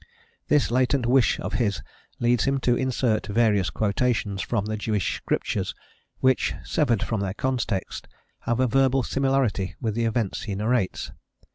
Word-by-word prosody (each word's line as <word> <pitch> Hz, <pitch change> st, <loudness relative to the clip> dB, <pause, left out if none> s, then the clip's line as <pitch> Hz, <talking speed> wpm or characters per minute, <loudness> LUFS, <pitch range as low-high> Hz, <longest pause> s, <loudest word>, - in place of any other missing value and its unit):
This 145 Hz, -5 st, +2 dB
latent 130 Hz, +1 st, +2 dB
wish 125 Hz, +1 st, +3 dB
of -, -, -4 dB
his 100 Hz, -4 st, -1 dB, 0.4 s
leads 120 Hz, 0 st, +2 dB
him 135 Hz, 0 st, +1 dB
to 120 Hz, -1 st, +3 dB
insert 125 Hz, -4 st, 0 dB
various 105 Hz, -3 st, +2 dB
quotations 105 Hz, -2 st, 0 dB
from 110 Hz, -4 st, -1 dB
the 110 Hz, 0 st, -2 dB
Jewish 105 Hz, -3 st, -1 dB
Scriptures -, -, -2 dB, 0.5 s
which, 130 Hz, 0 st, +2 dB
severed 125 Hz, -9 st, +1 dB
from 110 Hz, -3 st, -2 dB
their 95 Hz, -1 st, -2 dB
context, 120 Hz, -7 st, -2 dB, 0.3 s
have 120 Hz, +1 st, -1 dB
a 130 Hz, -, +4 dB
verbal 135 Hz, +1 st, +2 dB
similarity 135 Hz, -8 st, 0 dB
with 110 Hz, -3 st, -1 dB
the 115 Hz, +1 st, 0 dB
events 115 Hz, -3 st, -1 dB
he 100 Hz, -, -4 dB
narrates. 110 Hz, -1 st, -1 dB
115 Hz, 150 wpm, -25 LUFS, 105-130 Hz, 0.5 s, a